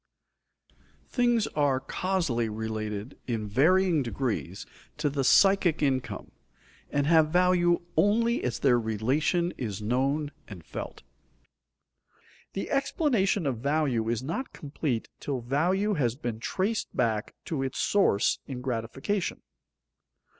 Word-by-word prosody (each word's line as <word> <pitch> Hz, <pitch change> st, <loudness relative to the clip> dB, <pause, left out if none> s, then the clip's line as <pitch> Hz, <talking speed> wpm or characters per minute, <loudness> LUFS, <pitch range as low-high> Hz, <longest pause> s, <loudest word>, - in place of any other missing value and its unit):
_Things 240 Hz, -3 st, +3 dB
are 145 Hz, -3 st, +2 dB
causally 140 Hz, -7 st, -1 dB
related 110 Hz, +1 st, -4 dB
in 110 Hz, -4 st, -2 dB
varying 165 Hz, -, +3 dB
degrees 115 Hz, -6 st, -3 dB, 0.3 s
to 150 Hz, -1 st, 0 dB
the 140 Hz, -1 st, -1 dB
psychic 185 Hz, 0 st, +4 dB
income, 130 Hz, -3 st, -1 dB, 0.6 s
and 145 Hz, -1 st, 0 dB
have 160 Hz, 0 st, +5 dB
value 175 Hz, 0 st, +3 dB
only 230 Hz, +4 st, +2 dB
as 120 Hz, -2 st, -1 dB
their 125 Hz, -3 st, +3 dB
relation 135 Hz, -, 0 dB
is 105 Hz, -5 st, -3 dB
known 135 Hz, +7 st, 0 dB, 0.2 s
and 90 Hz, -6 st, -10 dB
felt._ -, -, -7 dB, 1.5 s
The 195 Hz, -, -4 dB
explanation 250 Hz, -, +1 dB
of 130 Hz, -5 st, -1 dB
value 135 Hz, -4 st, 0 dB
is 120 Hz, +1 st, -1 dB
not 170 Hz, -, -4 dB
complete 140 Hz, -4 st, -3 dB
till 135 Hz, -4 st, -3 dB
value 180 Hz, -, +1 dB
has 125 Hz, -, 0 dB
been 120 Hz, -4 st, -4 dB
traced 195 Hz, -, -2 dB
back 110 Hz, -3 st, 0 dB
to 155 Hz, -5 st, -2 dB
its 135 Hz, -1 st, -3 dB
source 160 Hz, -, +2 dB
in 130 Hz, -3 st, -5 dB
gratification. 130 Hz, -, -2 dB
140 Hz, 120 wpm, -28 LUFS, 120-180 Hz, 1.5 s, have